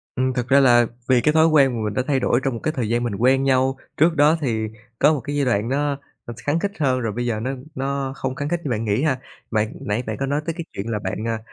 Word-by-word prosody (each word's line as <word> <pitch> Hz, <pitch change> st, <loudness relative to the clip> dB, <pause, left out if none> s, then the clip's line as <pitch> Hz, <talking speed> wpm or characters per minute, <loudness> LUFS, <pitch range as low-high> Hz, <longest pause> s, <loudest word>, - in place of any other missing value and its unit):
Ừm, 130 Hz, 0 st, 0 dB
thực 125 Hz, -1 st, -2 dB
ra 140 Hz, +2 st, +5 dB
là 120 Hz, -3 st, +6 dB, 0.2 s
vì 125 Hz, -2 st, +5 dB
cái 150 Hz, -, +2 dB
thói 160 Hz, +1 st, +5 dB
quen 140 Hz, -5 st, +5 dB
mà 110 Hz, -, -3 dB
mình 105 Hz, -, -2 dB
đã 130 Hz, -, 0 dB
thay 140 Hz, -3 st, +2 dB
đổi 120 Hz, -, +2 dB
trong 135 Hz, -, 0 dB
một 115 Hz, -, -5 dB
cái 155 Hz, -, +1 dB
thời 115 Hz, -4 st, -1 dB
gian 120 Hz, +1 st, +1 dB
mình 110 Hz, -4 st, -2 dB
quen 130 Hz, +4 st, +3 dB
nhau, 130 Hz, 0 st, +2 dB, 0.2 s
trước 165 Hz, +2 st, +4 dB
đó 150 Hz, +2 st, +5 dB
thì 110 Hz, -5 st, -1 dB, 0.3 s
có 155 Hz, -, +5 dB
một 145 Hz, -, -2 dB
cái 145 Hz, +4 st, -4 dB
giai 145 Hz, -1 st, +1 dB
đoạn 115 Hz, -2 st, +1 dB
nó 140 Hz, +1 st, 0 dB, 0.3 s
thật 120 Hz, -, -5 dB
khắng 150 Hz, +3 st, +1 dB
khít 200 Hz, +1 st, -1 dB
hơn 130 Hz, -4 st, +2 dB
rồi 115 Hz, -3 st, -2 dB
bây 120 Hz, +2 st, -3 dB
giờ 115 Hz, -3 st, -1 dB
nó 125 Hz, +4 st, -2 dB, 0.2 s
nó 135 Hz, 0 st, -2 dB
không 130 Hz, -1 st, -3 dB
khắng 145 Hz, +1 st, -3 dB
khít 175 Hz, -1 st, 0 dB
như 145 Hz, -, -3 dB
bạn 115 Hz, 0 st, -1 dB
nghĩ 105 Hz, +3 st, +1 dB
ha. 135 Hz, -5 st, +1 dB, 0.3 s
Bạn, 110 Hz, -1 st, 0 dB
nãy 105 Hz, +5 st, -2 dB
bạn 110 Hz, -1 st, -3 dB
có 135 Hz, -, 0 dB
nói 145 Hz, +2 st, -1 dB
tới 165 Hz, -, -2 dB
cái 170 Hz, -, -5 dB
chuyện 100 Hz, +3 st, -5 dB
là 105 Hz, -, -1 dB
bạn, 110 Hz, +2 st, -4 dB
à, 115 Hz, -1 st, -1 dB
130 Hz, 295 wpm, -22 LUFS, 115-145 Hz, 0.3 s, là